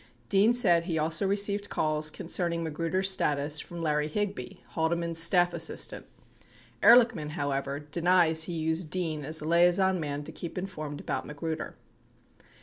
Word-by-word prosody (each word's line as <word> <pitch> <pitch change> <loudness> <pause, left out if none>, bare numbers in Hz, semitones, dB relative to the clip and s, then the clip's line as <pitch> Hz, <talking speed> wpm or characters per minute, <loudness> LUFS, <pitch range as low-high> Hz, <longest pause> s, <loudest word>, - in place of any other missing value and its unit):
Dean 200 +4 +4
said 180 -9 +3
he 170 -3 -2
also 160 +5 0
received 200 +1 0
calls 155 0 -1
concerning 170 +1 -2
Magruder's 165 +5 0
status 150 -4 +2
from 170 +2 -8
Larry 150 -2 0
Higby, 195 -6 -4
Haldeman's 165 +4 -1
staff 175 +1 +3
assistant. 165 -1 -2 0.7
90 - - +2 0.2
Ehrlichman, 185 -10 -7
however, 140 -2 -3
denies 160 +1 +2
he 175 - -5
used 160 0 -2
Dean 160 -4 -3
as 155 +2 0
a 155 - -5
liaison 175 +2 +3
man 145 -2 -4
to 160 - -7
keep 165 +3 -8
informed 155 -6 -6
about - - -4
Magruder. 155 +2 -5
165 Hz, 145 wpm, -28 LUFS, 155-180 Hz, 0.7 s, Dean